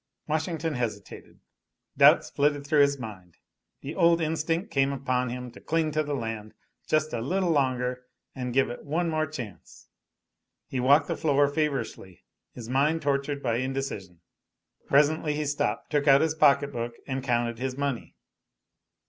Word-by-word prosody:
Washington 160 0 -1
hesitated. 115 -6 -6 0.5
Doubts - - +6
flitted 145 0 +1
through 150 0 +4
his 140 0 +3
mind. 100 -8 -10 0.4
The 140 - -6
old 170 -1 +4
instinct 165 +2 -1
came 135 0 +2
upon 130 -2 -1
him 125 0 -6
to - - -14
cling 160 -1 0
to 155 +1 +1
the 145 -1 -2
land 115 -4 -5 0.3
just 155 0 +1
a 115 - -2
little 180 +7 0
longer 125 -3 0 0.3
and 125 -2 -4
give 130 -1 +2
it 120 - -8
one 165 +3 -1
more 155 0 0
chance. 120 - -9 0.8
He 130 - -4
walked 140 +5 +4
the - - -1
floor 145 -2 +3
feverishly, 140 - -3 0.3
his 115 -2 -9
mind 145 +6 +1
tortured 140 0 -1
by 115 -2 +1
indecision. 130 -9 -4 0.7
Presently 150 +1 +3
he 150 0 -2
stopped, 145 -7 -2
took 145 -1 +1
out 135 0 +7
his 160 -1 +1
pocket 145 -2 +4
book 120 -2 -4
and 135 -1 -3
counted 120 -2 0
his 130 0 -3
money. 140 -4 -3
140 Hz, 155 wpm, -27 LUFS, 125-155 Hz, 0.8 s, out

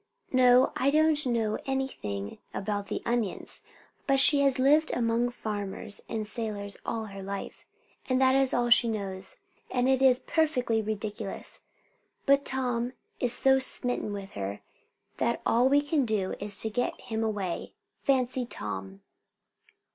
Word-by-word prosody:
No; 255 0 +5
I 270 - +2
don't 305 0 +3
know 225 -3 0
anything 105 - -3 0.2
about 205 0 -3
the - - -4
onions; 235 -5 -2 0.5
but 270 -1 +4
she 285 +2 +7
has 275 -2 +3
lived 295 +4 +4
among 235 0 +1
farmers 210 -3 -5
and 215 -1 -3
sailors 205 -3 -3
all 225 -1 -3
her 195 -2 -9
life, 195 +1 -7 0.4
and 255 0 +2
that 260 0 +4
is 270 -1 +3
all 240 0 +1
she 235 0 +7
knows. 195 -4 -4 0.3
And 250 0 +1
it 265 0 +3
is 260 -2 +6
perfectly 255 -8 0
ridiculous, 210 -1 -4 0.7
but 280 +1 +4
Tom 250 -2 -1 0.3
is 245 - +1
so 265 +2 +6
smitten 250 -4 -2
with 200 -1 -6
her 100 +1 -5 0.6
that - - 0
all 245 +3 +4
we 285 +1 +4
can 290 -1 +1
do 215 -5 -1
is 205 0 0
to 220 - -1
get 245 +3 -1
him 225 0 -3
away. 200 -5 -3 0.2
Fancy, 255 -2 +1
Tom!" 95 - -6
235 Hz, 145 wpm, -28 LUFS, 205-265 Hz, 0.7 s, she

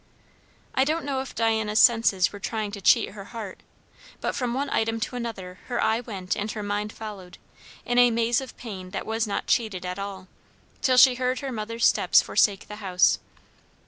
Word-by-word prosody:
I 260 - +3
don't 310 +2 -1
know 275 -2 -1
if 265 - -9
Diana's 220 -2 +1
senses 225 -7 +4
were 205 - -8
trying 215 0 -3
to 200 -1 -7
cheat - - +4
her 195 -1 -10
heart; 215 -3 -8 0.6
but - - -2
from 245 -2 -2
one 280 +2 -1
item 225 0 0
to 250 - -3
another 195 -7 -6
her 245 - -2
eye 220 +1 +2
went 195 -6 -4
and 210 +1 -3
her 210 - -5
mind 205 +1 -2
followed, 200 -6 -9 0.5
in 245 0 +2
a 245 0 +7
maze 230 +1 +1
of 265 - -10
pain 190 -6 -8
that - - -4
was 225 0 -1
not 205 - -2
cheated 205 -6 0
at 180 +2 -4
all, 195 -2 -6 0.5
till 255 -2 +3
she 255 +1 +8
heard 255 +1 -1
her 275 -1 -4
mother's 230 0 -2
steps - - +5
forsake 200 -2 +1
the 210 - -8
house. 185 -4 +2
220 Hz, 195 wpm, -25 LUFS, 200-245 Hz, 0.6 s, she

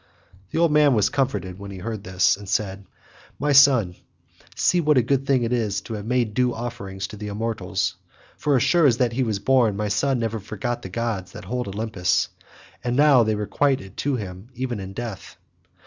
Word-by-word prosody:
The - - -4
old 165 -1 +3
man 150 -3 +5
was 105 - +2
comforted 100 -9 -2
as 100 0 -7
he 95 - -8
heard 105 +1 -6
him 95 - -8 0.3
and 100 -2 -10
said, 95 0 -2 0.5
"My 145 +1 0
son, 130 -10 +6 0.6
see 180 - +2
what 150 -3 +3
a 125 - +5
good 135 +2 0
thing 130 -3 +3
it 115 +1 -1
is 110 -5 0
to 115 - -8
have 105 0 -6
made 120 -3 0
due 125 +1 +1
offerings 110 -5 -5
to 105 - -9
the 105 +1 -6
immortals; 110 +2 -2 0.4
for 145 -2 +1
as 125 - +3
sure 170 -4 +4
as 120 -3 +3
that 120 -2 +1
he 130 - -1
was 110 -5 0
born 115 -2 +2
my 105 0 -1
son 135 +5 +1
never 115 -1 -2
forgot 110 +4 -4
the 95 - -7
gods 95 -3 -3
that 105 -2 -9
hold 125 +3 -3
Olympus, 100 -2 0 0.5
and 120 0 -1
now 145 -2 +6
they 110 -1 +1
requite 130 +6 +1
it 95 0 -12
to 145 -1 0
him 100 -1 -7
even 125 -3 -3
in 95 0 -7
death. 115 -3 -7
115 Hz, 210 wpm, -23 LUFS, 100-130 Hz, 0.6 s, son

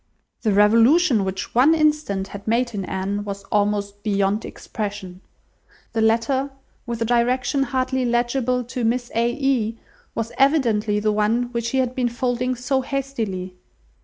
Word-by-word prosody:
The 220 - +1
revolution 230 - +5
which 190 0 -4
one 275 +7 +5
instant 300 -11 +1
had 200 +1 -9
made 235 +2 +1
in 195 -2 -3
Anne, 195 +2 -3
was 200 -1 -6
almost 205 -1 0
beyond 200 0 0
expression. 200 -4 -6 0.7
The 225 - 0
letter, 235 +5 +2 0.4
with 235 -1 -2
a - - -1
direction 245 +3 +1
hardly 260 0 0
legible, 245 +1 0
to 245 +1 -5
"Miss 240 +2 0
A. 235 +1 +2
E.—," 245 -5 0 0.4
was 230 0 -3
evidently 230 -7 +3
the 215 0 +1
one 225 +4 +1
which 235 -1 -2
he 265 - -1
had 255 -1 +1
been 250 -2 0
folding 250 +1 -1
so 265 +2 0
hastily. 225 -10 -4
235 Hz, 150 wpm, -22 LUFS, 210-255 Hz, 0.7 s, revolution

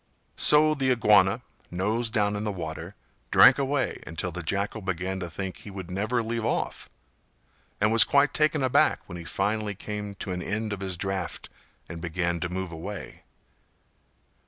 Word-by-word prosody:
So 155 +1 +5
the 135 -3 0
Iguana, 105 -2 +4 0.3
nose 110 +6 -1
down 105 -2 +1
in 105 - -3
the 105 - -1
water, 85 +1 -6 0.3
drank - - +7
away 140 0 -1
until 80 +3 -4
the 90 +1 -5
Jackal 100 +6 -2
began 95 0 -3
to 90 -2 -5
think 95 +3 -5
he - - -11
would 95 -2 -8
never 110 +6 0
leave 115 0 -3
off, 115 - -2 0.9
and 105 +1 +3
was 115 - +9
quite 140 +1 +3
taken 150 -2 +2
aback 130 - +3
when 85 - -8
he 85 - -9
finally 105 +2 -1
came 105 0 -6
to 95 - -6
an 90 0 -3
end 110 +2 -2
of 100 - -6
his 95 -2 -3
draft, 95 0 -4 0.4
and 85 0 -8
began 85 0 -1
to 85 - -3
move 95 0 -4
away. 90 +4 -7
100 Hz, 170 wpm, -26 LUFS, 90-110 Hz, 0.9 s, was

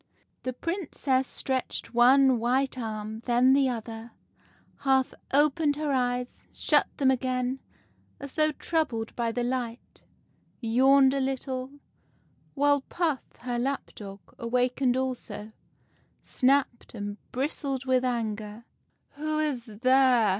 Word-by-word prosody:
The 255 - -3
Princess 280 -5 -1
stretched 260 -2 -3
one 255 +1 +5
white 260 +4 +1
arm, 220 -2 -5
then 250 +2 +4
the 270 -1 +4
other, 225 -1 -6 0.6
half 265 -2 +2 0.2
opened 290 +1 +3
her 300 -1 -2
eyes, 250 -1 -2
shut - - +2
them 265 -2 +4
again, 255 0 -1 0.6
as 280 -1 -7
though 310 -1 +3
troubled 290 -8 -2
by 235 -1 0
the 245 +1 -2
light, 245 -1 -4 0.6
yawned 265 +3 +5
a 275 - 0
little; 265 0 -3 0.8
while 285 0 +3
Puff, 315 -2 -1 0.2
her 245 -1 -2
lap 270 +3 -2
dog, 195 -2 -9 0.2
awakened 250 +2 +1
also, 240 -5 -4 0.7
snapped 260 -3 +1
and 205 -1 -5
bristled 270 0 -2
with 260 -1 +2
anger. 220 -2 -3
" - - -45
' - - -48
Who 310 +1 -2
is 290 -6 -1
there 250 +1 +4
255 Hz, 125 wpm, -27 LUFS, 240-275 Hz, 0.8 s, one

